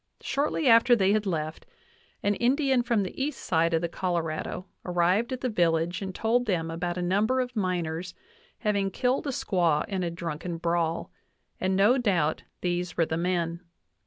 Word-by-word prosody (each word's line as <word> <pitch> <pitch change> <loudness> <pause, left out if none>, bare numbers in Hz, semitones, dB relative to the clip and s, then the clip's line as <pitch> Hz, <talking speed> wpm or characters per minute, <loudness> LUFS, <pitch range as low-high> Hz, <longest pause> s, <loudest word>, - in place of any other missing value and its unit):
Shortly 285 +1 0
after 235 +1 +7
they 195 -3 +3
had 215 -1 0
left, 155 -3 -3 0.6
an 205 - +3
Indian 265 +3 +2
from 235 -4 +1
the 190 +7 -4
east 300 +2 -3
side 165 0 +1
of 160 - +1
the 170 - 0
Colorado 170 0 -3 0.2
arrived 180 +7 +1
at 255 - -3
the 255 - 0
villagfe 170 -3 +1
and 190 -2 -5
told 240 +2 +1
them 165 -5 0
about 175 +1 -3
a 180 - -1
number 210 +8 +2
of 250 -1 -2
miners 180 -3 -2 0.4
having 200 -3 0
killed 255 +8 0
a - - 0
squaw 175 - +1
in 195 -2 -2
a 175 - -1
drunken 170 0 -5
brawl, 170 -1 -1 0.5
and 190 0 +1
no 210 +7 +4
doubt 175 -10 +1 0.2
these 175 -1 -2
were 165 - +3
the 160 - -2
men. 170 -1 -1
185 Hz, 175 wpm, -27 LUFS, 170-225 Hz, 0.6 s, after